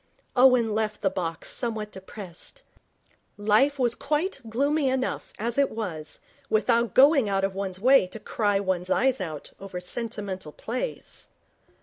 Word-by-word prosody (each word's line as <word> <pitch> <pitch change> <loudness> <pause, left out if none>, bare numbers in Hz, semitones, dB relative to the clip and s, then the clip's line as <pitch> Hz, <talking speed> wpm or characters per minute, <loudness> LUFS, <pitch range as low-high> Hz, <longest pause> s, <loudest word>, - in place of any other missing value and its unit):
Owen 250 -3 +5
left 215 -1 -1
the 195 - +3
box 165 -4 -3
somewhat 220 -3 -2
depressed. 190 - -9 0.7
Life 215 +8 +3
was 245 -3 +2
quite 300 +4 -1
gloomy 280 +4 +2
enough 260 0 -2
as 235 +4 -1
it 280 - +4
was, 175 -9 -5 0.3
without 230 +2 +2
going 275 -4 +6
out 195 -1 +1
of 195 0 0
one's 190 -1 -4
way 255 -2 +5
to 220 - -8
cry 205 -2 0
one's 185 -2 -1
eyes 260 +1 +2
out 155 -5 -5
over 195 -2 -6
sentimental 195 -4 -5
plays. 255 - -5
220 Hz, 140 wpm, -26 LUFS, 190-260 Hz, 0.7 s, going